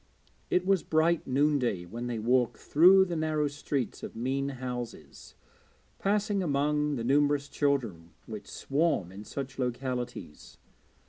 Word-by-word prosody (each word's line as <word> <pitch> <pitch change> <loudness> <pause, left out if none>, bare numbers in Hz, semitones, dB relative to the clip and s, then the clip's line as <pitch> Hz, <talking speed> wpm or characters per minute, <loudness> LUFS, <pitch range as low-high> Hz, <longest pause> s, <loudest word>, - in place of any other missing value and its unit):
It 180 0 +2
was 195 -1 +3
bright 160 +1 +1
noonday 130 -8 +1
when 120 +7 -6
they 120 -2 -3
walked 120 +2 +1
through 185 +5 +6
the 175 -2 -4
narrow 155 -2 0
streets 145 -3 -3
of - - -7
mean 135 +4 -1
houses, 125 -3 -7 0.6
passing 205 0 +1
among 150 -1 +1
the 115 - -3
numerous 145 +2 +2
children 130 - -1 0.2
which - - -8
swarm 140 - 0
in 100 +3 -10
such 135 +2 -6
localities. 125 - -4
140 Hz, 130 wpm, -29 LUFS, 120-155 Hz, 0.6 s, through